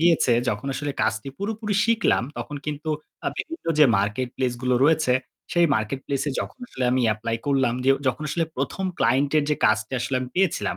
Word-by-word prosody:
গিয়েছে 165 Hz, -7 st, +4 dB, 0.2 s
যখন 105 Hz, +3 st, -2 dB
আসলে 145 Hz, +1 st, -3 dB
কাজটি 110 Hz, +4 st, -1 dB
পুরোপুরি 210 Hz, 0 st, -2 dB
শিখলাম 230 Hz, -, +2 dB, 0.2 s
তখন 120 Hz, +5 st, -5 dB
কিন্তু 150 Hz, +1 st, -4 dB, 0.4 s
আ -, -, +4 dB
বিভিন্ন 330 Hz, -, -6 dB
যে 150 Hz, -, +9 dB
market 105 Hz, +6 st, -1 dB
place 125 Hz, -2 st, 0 dB
গুলো 125 Hz, 0 st, +2 dB
রয়েছে 155 Hz, -4 st, +3 dB, 0.4 s
সেই 175 Hz, -1 st, +4 dB
market 110 Hz, +5 st, -2 dB
place 140 Hz, 0 st, -1 dB
এ -, -, 0 dB
যখন -, -, -6 dB
আসলে 130 Hz, -, -4 dB
আমি 130 Hz, -, +2 dB
apply 115 Hz, +2 st, -3 dB
করলাম, 135 Hz, -4 st, +2 dB
যে 135 Hz, -, +5 dB, 0.2 s
যখন 130 Hz, +4 st, 0 dB
আসলে 165 Hz, +1 st, 0 dB
১ম 140 Hz, +8 st, -2 dB
client 135 Hz, +4 st, +2 dB
এর 145 Hz, -, +1 dB
যে 150 Hz, -, +2 dB
কাজটা 110 Hz, +3 st, +1 dB
আসলে 130 Hz, +2 st, -1 dB
আমি 125 Hz, -, -4 dB
পেয়েছিলাম, 190 Hz, -3 st, +1 dB
135 Hz, 195 wpm, -24 LUFS, 125-160 Hz, 0.4 s, যে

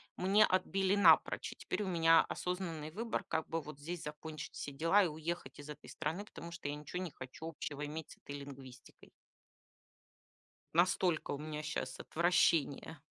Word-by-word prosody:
мне 200 Hz, +4 st, +5 dB
отбили 190 Hz, +1 st, +2 dB
напрочь. 170 Hz, -6 st, +5 dB
И -, -, -9 dB
теперь 210 Hz, -, -2 dB
у -, -, -3 dB
меня 165 Hz, -2 st, +6 dB
осознанный 170 Hz, -4 st, -3 dB
выбор, 225 Hz, +6 st, -2 dB
как 160 Hz, -, -1 dB
бы 165 Hz, 0 st, -1 dB
вот 150 Hz, -1 st, -9 dB
здесь 170 Hz, +3 st, -5 dB
закончить 155 Hz, +1 st, -6 dB
все 145 Hz, -, -4 dB
дела 165 Hz, +8 st, +4 dB
и -, -, +2 dB
уехать 160 Hz, +2 st, -4 dB
из 145 Hz, +1 st, -9 dB
этой 150 Hz, 0 st, -9 dB
страны, 160 Hz, +6 st, -3 dB
потому 170 Hz, -4 st, -9 dB
что 170 Hz, -4 st, -5 dB
я 145 Hz, -, -2 dB
ничего 150 Hz, +5 st, -5 dB
не 175 Hz, -, -5 dB
хочу 130 Hz, +5 st, -8 dB
общего 150 Hz, -2 st, -4 dB
иметь 155 Hz, +1 st, -6 dB
с -, -, -12 dB
этой 145 Hz, 0 st, -7 dB
лингвистикой. 135 Hz, -2 st, -12 dB, 1.6 s
Настолько 175 Hz, 0 st, +3 dB
у -, -, -1 dB
меня 150 Hz, +1 st, -4 dB
щас 155 Hz, 0 st, -3 dB
отвращение. 165 Hz, -2 st, +2 dB
160 Hz, 170 wpm, -35 LUFS, 150-180 Hz, 1.6 s, меня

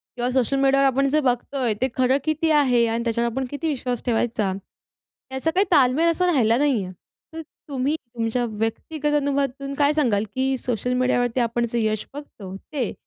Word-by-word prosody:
किंवा 245 Hz, 0 st, -1 dB
सोशल 260 Hz, +1 st, +1 dB
मीडियावर 275 Hz, 0 st, +3 dB
आपण 275 Hz, +1 st, +2 dB
जे 305 Hz, +3 st, +2 dB
बघतो 255 Hz, +1 st, -1 dB
आहे, 240 Hz, -5 st, +1 dB
ते 260 Hz, -, +3 dB
खरं 255 Hz, +1 st, +3 dB
किती 310 Hz, +1 st, 0 dB
आहे 255 Hz, -6 st, +4 dB
आणि 230 Hz, +1 st, -1 dB
त्याच्यावर 235 Hz, 0 st, 0 dB
आपण 265 Hz, +3 st, -2 dB
किती 290 Hz, +3 st, -3 dB
विश्वास 250 Hz, -5 st, -2 dB
ठेवायचा, 225 Hz, -4 st, 0 dB, 0.8 s
याचा 265 Hz, +5 st, -1 dB
काही 380 Hz, +4 st, +2 dB
तालमेल 290 Hz, +2 st, +4 dB
असा 360 Hz, +2 st, 0 dB
राहिला 235 Hz, -7 st, +3 dB
नाही 270 Hz, -7 st, +1 dB
आहे. 185 Hz, 0 st, -8 dB, 0.4 s
तर 325 Hz, -, -5 dB, 0.3 s
तुम्ही 275 Hz, +2 st, 0 dB
तुमच्या 235 Hz, -3 st, -3 dB
व्यक्तिगत 275 Hz, +8 st, -2 dB
अनुभवातून 275 Hz, -1 st, -2 dB
काय 285 Hz, +1 st, +2 dB
सांगाल 240 Hz, -10 st, +1 dB
की 265 Hz, +1 st, +1 dB
सोशल 250 Hz, 0 st, -2 dB
मीडियावरती 250 Hz, -1 st, +1 dB
आपण 235 Hz, 0 st, 0 dB
जे 235 Hz, -, +1 dB
यश 215 Hz, -1 st, -1 dB
बघतो, 215 Hz, -10 st, -9 dB
ते 255 Hz, +1 st, -4 dB
255 Hz, 180 wpm, -23 LUFS, 235-285 Hz, 0.8 s, आहे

